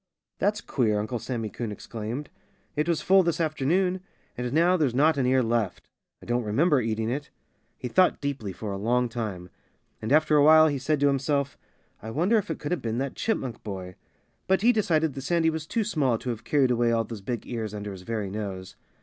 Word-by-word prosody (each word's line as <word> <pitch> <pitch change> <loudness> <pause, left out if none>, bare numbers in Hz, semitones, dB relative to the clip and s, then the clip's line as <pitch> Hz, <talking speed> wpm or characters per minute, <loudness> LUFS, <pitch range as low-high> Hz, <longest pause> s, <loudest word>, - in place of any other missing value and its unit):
"That's 205 +1 +1
queer!" 110 -6 0
Uncle 110 +3 -3
Sammy 115 -1 -3
Coon 115 -3 -4
exclaimed. 115 +6 -6 0.4
"It 150 +3 0
was 160 -3 +1
full 195 +1 +6
this 170 -2 0
afternoon. 170 +4 +1 0.4
And 125 0 -3
now 170 +5 +4
there's 145 -8 +1
not 155 +4 +4
an 135 -3 +1
ear 130 0 +3
left. 115 -4 -1 0.4
I - - -11
don't 120 +1 0
remember 130 +7 +2
eating 110 -1 -1
it." 145 +3 -4 0.5
He - - -5
thought 185 +8 +3
deeply 140 -8 -3
for 100 +3 -6
a 100 - -4
long 120 +3 +1
time. 105 -7 -5 0.5
And 110 - -3
after 155 +1 +4
a 145 - +6
while 155 +1 +7
he 140 -2 -2
said 150 +3 0
to 145 - +5
himself: 140 0 0 0.5
"I 110 - -7
wonder 180 - +2
if 200 - -6
it 160 - -2
could 145 - -5
have 180 - 0
been 115 0 -2
that 135 +1 -2
Chipmunk 130 - -2
boy?" 95 -3 -6 0.5
But 190 +2 +2
he 245 +2 +6
decided 160 - +1
that 135 - -6
Sandy 160 +3 +2
was 160 -1 -5
too 230 +4 0
small 145 - +1
to 125 - -4
have 115 -2 -6
carried 135 -4 +2
away 120 -1 +2
all 115 -1 +2
those 110 -2 -8
big 120 +4 -4
ears 115 -3 -4
under 105 -1 -5
his 95 -2 -9
very 105 -1 -3
nose. 95 -3 -5
130 Hz, 215 wpm, -26 LUFS, 110-155 Hz, 0.5 s, while